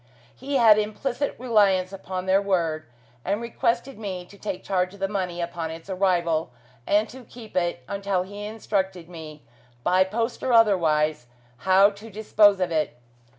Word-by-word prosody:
He 275 Hz, +2 st, -4 dB
had 225 Hz, -4 st, +6 dB
implicit 245 Hz, +6 st, -2 dB
reliance 200 Hz, -6 st, +2 dB
upon 185 Hz, -1 st, -5 dB
their 190 Hz, +1 st, +3 dB
word, 165 Hz, -5 st, -1 dB, 0.4 s
and 205 Hz, -, -1 dB
requested 235 Hz, +2 st, -1 dB
me 185 Hz, -4 st, -5 dB
to 200 Hz, -, -16 dB
take 200 Hz, -2 st, -5 dB
charge 185 Hz, 0 st, -1 dB
of -, -, -16 dB
the 195 Hz, -, 0 dB
money 185 Hz, -3 st, -3 dB
upon 170 Hz, -1 st, -4 dB
its 165 Hz, +4 st, -8 dB
arrival, 175 Hz, -5 st, +1 dB, 0.4 s
and 210 Hz, +2 st, +3 dB
to 260 Hz, +1 st, -11 dB
keep 230 Hz, -2 st, -13 dB
it 175 Hz, -7 st, 0 dB
until 195 Hz, -1 st, -1 dB
he 205 Hz, +2 st, -8 dB
instructed 195 Hz, -5 st, -2 dB
me, 160 Hz, -3 st, -10 dB, 0.4 s
by 185 Hz, +6 st, +4 dB
post 230 Hz, +5 st, -3 dB
or 255 Hz, -, 0 dB
otherwise, 155 Hz, -, +3 dB, 0.4 s
how 195 Hz, +2 st, +7 dB
to 210 Hz, +3 st, -12 dB
dispose 205 Hz, -1 st, +4 dB
of 180 Hz, -2 st, 0 dB
it. 155 Hz, -6 st, -1 dB
195 Hz, 160 wpm, -25 LUFS, 175-215 Hz, 0.4 s, how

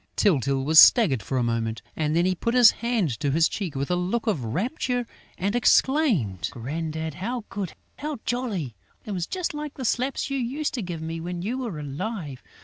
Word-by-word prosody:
Tyltyl 140 Hz, -, +2 dB
was 160 Hz, +2 st, +7 dB
staggered 160 Hz, -, +7 dB
for 130 Hz, +7 st, -3 dB
a 125 Hz, -, +2 dB
moment; 115 Hz, -1 st, -2 dB
and 155 Hz, 0 st, 0 dB
then 170 Hz, +1 st, +3 dB
he 185 Hz, -, +2 dB
put 230 Hz, +7 st, -2 dB
his 245 Hz, -3 st, +8 dB
hand 225 Hz, -, -1 dB
to 145 Hz, -2 st, 0 dB
his 160 Hz, +4 st, +4 dB
cheek 180 Hz, -8 st, -4 dB
with 140 Hz, +4 st, -2 dB
a -, -, +3 dB
look 185 Hz, +7 st, -1 dB
of 200 Hz, -, 0 dB
rapture 245 Hz, -, -1 dB, 0.3 s
and 200 Hz, +4 st, -1 dB
exclaimed: 235 Hz, -, +2 dB
"Grandad, 160 Hz, +5 st, -4 dB
how 235 Hz, -, -4 dB
good, 195 Hz, -4 st, -4 dB, 0.3 s
how 300 Hz, -1 st, -3 dB
jolly! 215 Hz, -, -2 dB, 0.3 s
It 215 Hz, -, -5 dB
was 180 Hz, -3 st, -2 dB
just 365 Hz, -4 st, -3 dB
like 295 Hz, -1 st, -6 dB
the 260 Hz, -, -5 dB
slaps 260 Hz, +4 st, -1 dB
you 275 Hz, -, 0 dB
used 270 Hz, +5 st, -2 dB
to 245 Hz, -, -2 dB
give 175 Hz, -4 st, -5 dB
me 165 Hz, +1 st, -4 dB
when 175 Hz, +1 st, -5 dB
you 240 Hz, +6 st, -2 dB
were 230 Hz, -11 st, -4 dB
alive!... 150 Hz, -, -5 dB
180 Hz, 200 wpm, -25 LUFS, 150-240 Hz, 0.3 s, his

